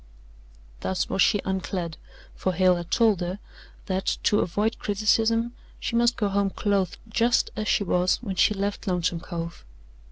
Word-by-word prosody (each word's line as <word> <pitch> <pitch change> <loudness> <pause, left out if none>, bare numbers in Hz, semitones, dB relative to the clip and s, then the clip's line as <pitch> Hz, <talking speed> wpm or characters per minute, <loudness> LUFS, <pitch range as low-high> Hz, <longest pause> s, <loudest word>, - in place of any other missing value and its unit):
Thus 190 -1 -2
was 195 - 0
she 205 0 +4
unclad, 185 -3 -2 0.4
for 185 - -1
Hale 185 0 +4
had 175 0 -6
told 220 -6 +3
her 180 +2 -2 0.5
that, 190 -1 -1
to 210 - +3
avoid 210 +6 0
criticism, 225 +3 +1 0.3
she 235 - -3
must 235 +1 +3
go 210 - +1
home 200 0 +1
clothed 195 -3 0
just 230 +2 +2
as 215 -1 -3
she - - +2
was 180 -1 +2
when 200 -6 -5
she 210 +3 +3
left 200 +2 -3
Lonesome 175 -2 0
Cove. 170 -1 -6
195 Hz, 160 wpm, -25 LUFS, 180-215 Hz, 0.5 s, she